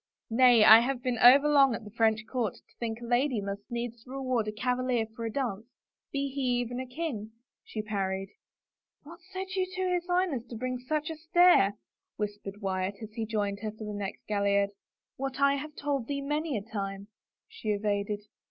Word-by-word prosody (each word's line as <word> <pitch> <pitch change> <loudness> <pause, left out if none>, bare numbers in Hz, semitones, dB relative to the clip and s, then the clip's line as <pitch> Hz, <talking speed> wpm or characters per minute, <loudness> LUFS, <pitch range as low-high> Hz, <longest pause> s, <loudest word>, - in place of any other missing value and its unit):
Nay 240 -1 +6
— - - +6
I 220 +1 +11
have 250 +1 -1
been 245 -3 -1
overlong 275 0 +7
at - - -7
the 210 - -10
French 220 0 +2
court 230 -5 -2
to - - -23
think 230 -1 -3
a - - -6
lady 245 0 +1
must 200 +2 -5
needs 235 -1 -4
reward 255 -4 -1
a - - -1
cavalier 250 +1 0
for 230 -2 -5
a 225 - -2
dance 230 -5 -3 0.2
— - - -64
be 280 0 -1
he 275 +1 -4 0.2
even 245 +1 -3
a 260 - -5
king! 245 -7 -4 0.2
" - - -64
she 215 - -5
parried. 195 -2 -2 0.4
" - - -54
What 335 +3 -12
said 380 0 -5
you 375 -1 0
to 370 0 0
his 355 0 -1
Highness 355 -9 0
to 235 - -8
bring 255 +2 -3
such 305 +5 -2
a - - -5
stare? 325 - +5 0.2
" - - -62
whispered 205 -1 -5
Wyatt, 190 0 -1
as 215 0 -9
he 225 -1 -3
joined 205 -2 -1
her 215 0 -3
for 220 +1 -9
the 210 -1 -5
next 200 -1 -5
gaillard. 200 -1 +2 0.3
" - - -64
What 270 0 -4
I 280 0 +5
have 295 +2 -5
told 280 -5 -2
thee 280 -1 -2
many 295 -1 -1
a 200 - -4
time," 200 -2 -5 0.4
she 445 - -7
evaded. 205 0 -1
235 Hz, 210 wpm, -29 LUFS, 210-275 Hz, 0.4 s, I